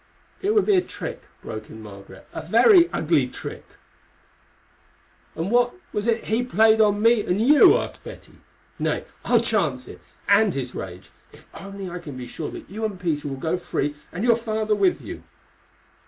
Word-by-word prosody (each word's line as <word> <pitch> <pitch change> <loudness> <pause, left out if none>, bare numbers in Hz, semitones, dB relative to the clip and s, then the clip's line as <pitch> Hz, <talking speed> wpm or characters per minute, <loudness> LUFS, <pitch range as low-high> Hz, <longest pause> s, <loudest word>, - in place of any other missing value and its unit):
"It 415 +3 0
would 420 - +4
be 410 - +4
a - - +4
trick," - - -7 0.2
broke 110 0 -7
in 110 - -11
Margaret—"a 100 +6 -11
very 340 - +6
ugly 150 -5 +1
trick." - - -8 1.7
"And 170 +5 -3
what 245 0 +2 0.2
was 210 +2 -2
it 230 -1 +1
he 220 +3 0
played 220 -2 +4
on 205 0 +2
me 230 -2 +4
and 180 +3 -1
you?" 285 +7 +6
asked - - -6
Betty. - - -12 0.4
"Nay, - - -1 0.2
I'll - - +3
chance - - -1
it, - - -12 0.3
and 215 -7 +4
his 125 -2 -4
rage, 90 -1 -8 0.2
if - - -18
only 195 -1 -8
I 180 0 -6
can 145 -6 -9
be 125 - -6
sure 150 +5 -6
that - - -10
you 215 +4 -7
and 205 -4 -3
Peter 155 -5 -2
will 135 -1 -5
go 160 +6 -1
free, 145 -4 -2 0.2
and 180 - -5
your 240 -1 +5
father 220 -2 -1
with 355 - +2
you." - - -8
200 Hz, 180 wpm, -23 LUFS, 150-230 Hz, 1.7 s, very